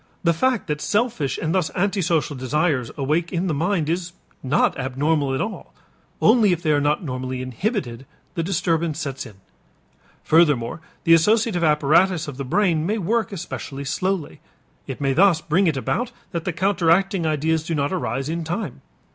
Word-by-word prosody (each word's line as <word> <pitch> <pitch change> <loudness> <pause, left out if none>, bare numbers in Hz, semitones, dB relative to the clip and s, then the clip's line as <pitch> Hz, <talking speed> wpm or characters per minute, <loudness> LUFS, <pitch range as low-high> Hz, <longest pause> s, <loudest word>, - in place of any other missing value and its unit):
The 170 -1 +3
fact 255 +6 +1
that 150 -2 -3
selfish 210 - 0
and 160 0 -2
thus 185 -5 +1
antisocial 180 -6 0
desires 130 0 0
awake 155 +5 0
in 175 +1 -1
the 175 - 0
mind 165 +1 0
is 170 +1 -2 0.3
not 135 +3 +2
abnormal 135 +2 0
at - - -1
all; 215 +1 -6 0.4
only 220 -3 +5
if 175 0 -1
they 155 - +2
are 145 -1 +3
not 150 +4 +1
normally 130 -2 -4
inhibited, 130 - -3 0.3
the 165 - -2
disturbance 165 -3 0
sets 140 -5 -4
in. 105 - -14 0.9
Furthermore 150 -4 +3 0.2
the 165 - +5
associative 210 +2 +3
apparatus 155 +3 +3
of 140 -3 -7
the 140 - -3
brain 165 +2 +1
may 210 +7 0
work 220 +3 0
especially 150 -6 -6
slowly; 175 +1 -2 0.5
it 135 - -6
may 135 -1 +1
thus 180 +1 +4
bring 170 +4 +1
it 155 -4 +1
about 235 - -1 0.2
that 170 -2 -4
the 180 - 0
counteracting 190 0 +2
ideas 155 +1 0
do 165 +1 -2
not 145 +3 -1
arise 135 -6 -2
in 165 +1 -2
time. 170 - -4
160 Hz, 170 wpm, -22 LUFS, 145-185 Hz, 0.9 s, only